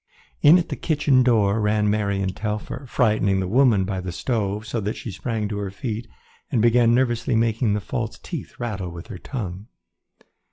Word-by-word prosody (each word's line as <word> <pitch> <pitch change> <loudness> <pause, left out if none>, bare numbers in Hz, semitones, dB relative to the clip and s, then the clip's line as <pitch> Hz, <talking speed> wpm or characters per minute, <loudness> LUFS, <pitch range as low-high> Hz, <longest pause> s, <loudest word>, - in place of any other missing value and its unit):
In 150 +4 +8
at 175 - -1
the - - -2
kitchen 145 -4 +2
door 110 -4 +3
ran 105 0 +2
Mary 100 -2 0
and 95 -1 -2
Telfer, 105 +5 -4
frightening 105 -6 +2
the 95 - -1
woman 115 -2 +4
by 95 -1 -3
the 90 -1 -5
stove 105 0 -2
so 115 0 -3
that 105 +2 -2
she 115 - -6
sprang 110 +2 -3
to 105 -1 -3
her 100 -1 -3
feet 110 +4 -5 0.4
and 120 - +2
began 120 +1 +4
nervously 120 -1 +1
making 110 -1 +2
the 105 - -2
false 115 +1 -4
teeth 165 -7 -7
rattle 105 -7 -3
with 85 +5 -10
her 95 -6 -7
tongue. 100 -5 -6
110 Hz, 190 wpm, -23 LUFS, 100-120 Hz, 0.4 s, In